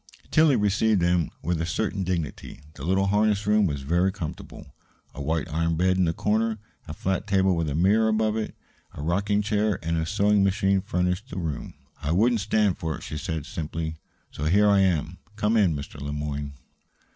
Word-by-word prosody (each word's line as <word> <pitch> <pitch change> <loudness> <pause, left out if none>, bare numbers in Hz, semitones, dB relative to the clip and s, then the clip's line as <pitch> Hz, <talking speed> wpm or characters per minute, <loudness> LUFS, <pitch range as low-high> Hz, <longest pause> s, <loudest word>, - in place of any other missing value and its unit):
Tillie 155 -3 +5
received 105 -2 +2
him 85 -2 +2
with 85 -2 -1
a - - 0
certain 100 +2 -1
dignity. 85 -7 -4
The 70 - -10
little 95 +4 +2
harness 105 +1 +2
room 105 -1 +3
was 70 -4 -3
very 85 +6 +2
comfortable. 80 -6 -8 0.4
A 70 - -7
white 80 0 -1
iron 85 0 0
bed 95 +2 +2
in 90 -2 +3
a - - +2
corner, 110 +4 0 0.3
a - - -6
flat 95 +2 -2
table 95 -2 +3
with 85 -2 -1
a 70 - -2
mirror 100 +7 +3
above 110 0 +1
it, 110 -1 -3 0.4
a 75 - -6
rocking 100 +5 +1
chair, 105 -1 +1
and 80 0 0
a 80 - -2
sewing 105 +1 +3
machine 95 0 +2
furnished 90 +4 -1
the - - -7
room. 80 -5 -4 0.3
"I 75 +1 -1
wouldn't 115 +4 +3
stand 105 -2 +1
for 80 -4 -2
it," - - -10
she 75 - -5
said 80 -5 -4
simply; 80 0 -4 0.3
"so 75 - -5
here 100 +6 +4
I 100 -1 +5
am. 90 -2 +1 0.2
Come 105 +1 +1
in, 95 -8 +3
Mr. 70 0 -7
Le 70 +1 -4
Moyne." 75 -1 -4
95 Hz, 195 wpm, -25 LUFS, 80-105 Hz, 0.4 s, Tillie